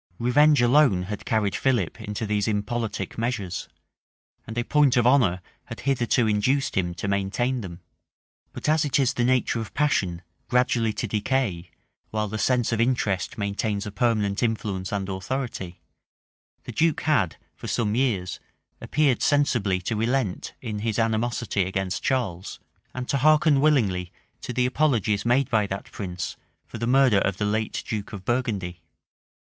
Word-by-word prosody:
Revenge 145 +3 +4
alone 120 -7 +4
had 105 +2 -6
carried 105 -3 +1
Philip 120 -10 0
into 105 +2 -4
these 105 -1 0
impolitic 110 +1 -2
measures; 115 -7 -3 0.8
and 110 +1 -7
a 120 - +1
point 140 -1 +3
of 120 - +3
honor 110 -9 +3 0.2
had - - -8
hitherto 125 -2 +1
induced 110 +6 +1
him 85 -2 0
to 100 - -4
maintain 100 +6 0
them. 90 -3 -8 0.7
But - - -6
as 155 +1 +3
it 145 - +1
is 135 -3 +2
the 120 - 0
nature 125 -1 +2
of 110 - -9
passion 100 - 0 0.3
gradually 125 -2 +2
to 115 - -3
decay, 105 -5 -1 0.4
while 110 0 -1
the 110 +2 -4
sense 120 +2 +1
of 115 0 +1
interest 115 -6 0
maintains 100 0 -2
a 105 - -5
permanent 105 -2 0
influence 105 -5 -2
and 100 -2 -2
authority, 95 -2 -4 0.8
the - - -7
duke 165 -1 +1
had, 115 - +1 0.2
for - - -8
some 105 -3 0
years, 110 -8 0 0.4
appeared 145 -5 +1
sensibly 120 -10 +2
to 110 +5 -2
relent 115 -2 -1
in 110 -3 -4
his 110 0 -2
animosity 115 -2 0
against 95 0 -2
Charles, 105 -9 -2 0.4
and 130 -1 -4
to 140 - +1
hearken 155 0 +4
willingly 100 -13 +2 0.3
to - - -5
the 125 +1 +1
apologies 120 -7 +1
made 125 +3 +3
by 110 -3 +2
that 100 0 -6
prince 90 -3 -5 0.3
for 115 - -9
the 115 - -1
murder 130 -5 +5
of 95 -1 -1
the 105 - -1
late 110 +1 -1
duke 105 -2 -4
of 95 -2 -8
Burgundy. 100 -9 -2
110 Hz, 160 wpm, -25 LUFS, 100-130 Hz, 0.8 s, murder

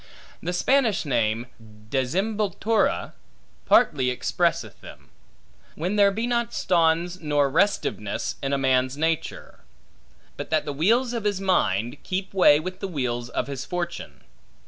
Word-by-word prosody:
The 175 - -3
Spanish 225 +2 +2
name, 115 -3 0 0.5
desemboltura, 200 - 0 0.5
partly 130 -4 +4
expresseth 125 - -1
them; - - -14 0.6
when 180 +6 -2
there 200 -1 +5
be 220 +4 -2
not 235 -1 -1
stonds 170 0 +1
nor 145 -3 +1
restiveness 165 - 0
in 135 - -2
a 140 - +2
man's 130 0 +1
nature; 160 +1 -3 0.8
but - - -6
that 155 -1 +1
the 145 - -3
wheels 230 - +2
of 230 -3 -3
his 205 -2 0
mind, 130 - 0
keep 190 +1 -4
way 175 -6 +6
with 185 +3 -6
the 195 - -3
wheels 120 -7 -3
of - - -2
his 135 -1 -5
fortune. 170 - -5
165 Hz, 135 wpm, -24 LUFS, 135-195 Hz, 0.8 s, way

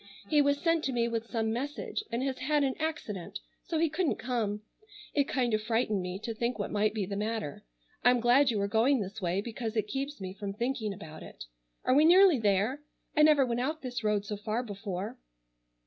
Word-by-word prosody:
He 295 +5 +4
was 285 0 +2
sent 330 -1 +2
to 270 - 0
me 235 -2 +1
with 230 -1 -3
some 225 -2 0
message 285 - -3
and 235 +2 -1
has 265 -1 -2
had 295 +3 +2
an 265 -1 +1
accident 225 - -4 0.3
so 335 -4 -1
he 330 +1 +3
couldn't 315 +1 0
come. 220 -4 -2 0.5
It 285 -1 +3
kind 245 -4 0
of 215 - +2
frightened 220 -2 0
me 180 +1 -4
to 230 - -3
think 235 +2 -2
what - - -3
might 210 +1 +1
be 205 -3 -1
the 200 - -4
matter. 210 -7 -3 0.4
I'm 245 0 +5
glad 250 +4 +5
you 220 -3 0
are 200 - +1
going 230 +6 +3
this 205 +1 -5
way 180 +2 0
because 225 0 -5
it 215 - +3
keeps 275 +5 -4
me 190 -1 -5
from 200 0 -5
thinking 235 0 -2
about 155 -5 -9
it. - - -10 0.4
Are 255 - +4
we 290 +3 +6
nearly 355 -2 +7
there? 210 +6 +1 0.3
I 300 - +4
never 300 -3 +6
went 240 0 -1
out 305 +4 -2
this 245 -2 -4
road 210 -1 +1
so 210 0 -4
far 215 +3 -2
before." 200 -3 -5
235 Hz, 215 wpm, -30 LUFS, 210-275 Hz, 0.5 s, nearly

